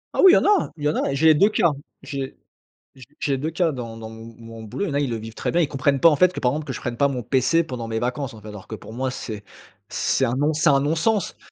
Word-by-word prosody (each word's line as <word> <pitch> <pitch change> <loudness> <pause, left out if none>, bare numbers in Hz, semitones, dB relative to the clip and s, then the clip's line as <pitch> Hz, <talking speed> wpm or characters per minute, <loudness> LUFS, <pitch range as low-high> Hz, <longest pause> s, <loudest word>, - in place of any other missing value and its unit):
Ah - - +3
oui, 380 - +9
il - - +8
y - - +6
en - - +1
a 410 -1 +3
il 150 - -9
y 150 - +2
en - - -1
a - - 0
et 140 - -1
j'ai 155 - +1
les - - +8
2 195 +8 +4
cas. 170 -6 +2 0.3
J'ai 135 -2 -5 0.6
j'ai 130 - -12 0.2
j'ai 140 -2 0
2 155 +4 -3
cas. 165 0 +1
Dans 115 -4 -6
dans 110 0 -8
m 115 0 -11
mon 115 -1 -10
boulot, 155 - -4
il - - -3
y - - -3
en - - -4
a 140 - +2
ils 145 - 0
le 115 - -2
vivent 110 +1 -9
très - - -3
bien, 175 - +2
ils 155 - +2
comprennent 135 0 0
pas 165 - +8
en 155 - +3
fait 180 +4 +4
que, - - -5
par 125 - +2
exemple 150 +3 -4
que 135 - -4
je - - -6
prenne 120 -1 -4
pas 140 - +3
mon 130 -3 -2
pc 135 +7 +2
pendant 125 -7 -6
mes 110 0 -3
vacances 125 +1 -3
en 110 - -12
fait. 105 - -11
Alors 105 -1 -10
que - - -7
pour 110 - -10
moi 130 +1 -2
c'est 105 -5 -7 0.4
c'est 135 - 0
un 120 -1 0
non 145 +3 +1
c'est 155 +1 +2
un 140 -1 +4
non 150 +4 0
sens! 210 +5 0
135 Hz, 340 wpm, -23 LUFS, 115-155 Hz, 0.6 s, oui